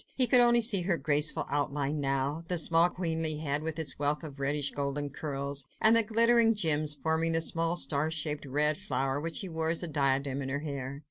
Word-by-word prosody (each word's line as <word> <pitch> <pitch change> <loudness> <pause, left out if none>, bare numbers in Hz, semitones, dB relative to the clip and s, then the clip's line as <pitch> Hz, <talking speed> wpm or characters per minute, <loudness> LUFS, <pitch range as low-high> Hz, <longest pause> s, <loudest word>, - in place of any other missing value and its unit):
He 255 - +4
could 250 0 +6
only 240 0 +4
see 215 -4 +3
her 175 -1 0
graceful 150 +1 0
outline 145 +1 -2
now, 140 +3 -2
the 180 - -1
small 165 +1 +4
queenly 160 -3 -2
head, 150 -1 -2
with 160 0 -4
its 160 -3 -3
wealth 145 +2 -1
of 145 -3 -9
reddish 140 +1 -1
golden 145 0 -4
curls, 140 -1 -4
and 220 +1 +6
the 230 - +7
glittering 230 +1 +3
gems 155 -6 +1
forming 160 +2 -1
the 165 - +3
small, 165 +1 0
star 155 -3 +1
shaped, 150 -2 -3
red 150 +3 0
flower 135 +1 -2
which 165 +1 -5
she 195 - -3
wore 160 -1 -2
as 165 +2 +1
a - - -1
diadem 140 -2 -1
in 135 - -5
her 140 +2 -3
hair. 140 -2 -6
150 Hz, 210 wpm, -29 LUFS, 140-165 Hz, -, the